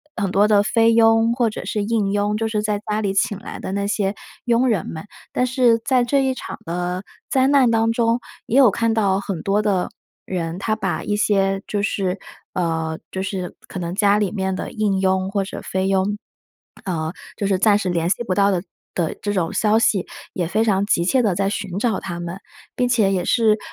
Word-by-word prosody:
很 195 -4 -1
多 205 +2 +4
的 205 -1 +4
菲 230 +2 +3
佣 225 0 +4
或 240 -2 +1
者 - - -7
是 210 -1 -1
印 210 -2 0
佣， 205 +1 +1
就 225 0 -1
是 210 -1 -1
在 210 -1 0
家 210 +1 0
里 200 -2 -1
请 195 0 +1
来 - - -8
的 190 - -5
那 200 0 -1
些 205 -1 0 0.3
佣 240 +2 +3
人 200 -8 0
们。 160 - -6 0.3
但 250 - +2
是 250 -2 +3
在 255 -2 +3
这 275 +2 +2
一 265 -1 +1
场 - - -7
的 180 +2 -3 0.3
灾 260 0 +3
难 275 -4 +5
当 225 0 +2
中， 230 +1 +1 0.3
也 245 - +1
有 255 -7 +7
看 230 +2 +1
到 200 -3 +2
很 195 -4 -4
多 200 +2 +2
的 195 -4 0 0.4
人， 170 -2 -3
他 215 +1 0
把 - - -2
一 205 - -1
些 195 -2 +2
就 205 -1 -1
是， 195 -2 -1 0.4
呃， 160 -2 -1
就 190 - -3
是 190 -2 -4
可 185 - -6
能 170 0 -3
家 205 -1 +4
里 205 -3 0
面 190 -2 -2
的 - - -5
印 205 -3 0
佣 190 0 +1
或 200 -1 0
者 - - -7
菲 190 0 -1
佣， 195 +2 +1 0.7
呃， 160 -3 -2 0.2
就 200 - -1
是 195 -2 +2
暂 205 -1 +5
时 200 -3 -3
联 170 -1 0
系 225 - 0
不 185 - -1
到 200 0 +4
的 180 -3 0 0.3
的 170 -3 -1
这 205 0 -1
种 175 -4 -1
消 215 +1 +3
息， 200 -4 +2 0.3
也 175 - -1
非 215 +5 +1
常 200 -3 +2
急 170 -4 +1
切 255 +6 +3
地 200 -6 +1
在 195 +1 +1
寻 200 -2 -3
找 225 -3 0
他 175 -2 -6
们， 175 +2 -5 0.4
并 245 - +1
且 220 -5 +3
也 180 -2 0
是， 220 -1 +3
205 Hz, 235 characters per minute, -21 LUFS, 190-225 Hz, 0.7 s, 有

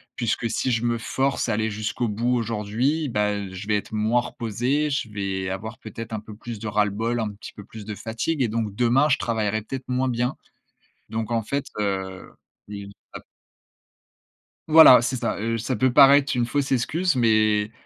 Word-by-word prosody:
Puisque 120 0 -1
si 125 - -1
je 115 -1 0
me 120 0 +1
force 135 +2 -1
à - - +1
aller 110 +1 -1
jusqu'au 110 +3 -2
bout 115 +4 0
aujourd'hui, 115 +7 -1
bah, 105 -2 +1
heu, 100 -2 -5
je 95 +2 -8
vais 105 -1 +2
être 105 - -7
moins 110 +3 +2
reposé, 120 +7 -1
je 135 -5 -2
vais 95 -2 -3
avoir 110 +4 -5
peut-être 115 +1 -8
un 110 - -2
peu 105 0 -11
plus 115 0 -8
de 110 - -5
ras-le-bol, 105 +3 0
un 110 -2 -2
petit 100 - -11
peu 105 - -11
plus 110 0 -10
de 105 0 -5
fatigue 115 +9 -3
et - - +1
donc 110 -2 -3
demain 125 +6 +3
je 140 - +3
travaillerai 110 -2 -1
peut-être 130 +4 -7
moins 130 +1 0
bien. 125 +1 -1 0.7
Donc 110 0 -4
en 115 -1 +1
fait 140 +6 -3
heu 95 -2 -3 0.4
et, 100 -1 -7 0.3
ap - - -9 1.4
Voilà, 155 -6 +9
c'est 125 +2 -1
ça. - - -2
Heu, 115 +2 -1
ça 125 +4 -2
peut 130 +3 +1
paraître 140 0 +6
une 120 -1 +1
fausse 140 +2 -1
excuse, 155 +7 +1
mais, 110 -3 +2
115 Hz, 190 wpm, -24 LUFS, 105-125 Hz, 1.4 s, Voilà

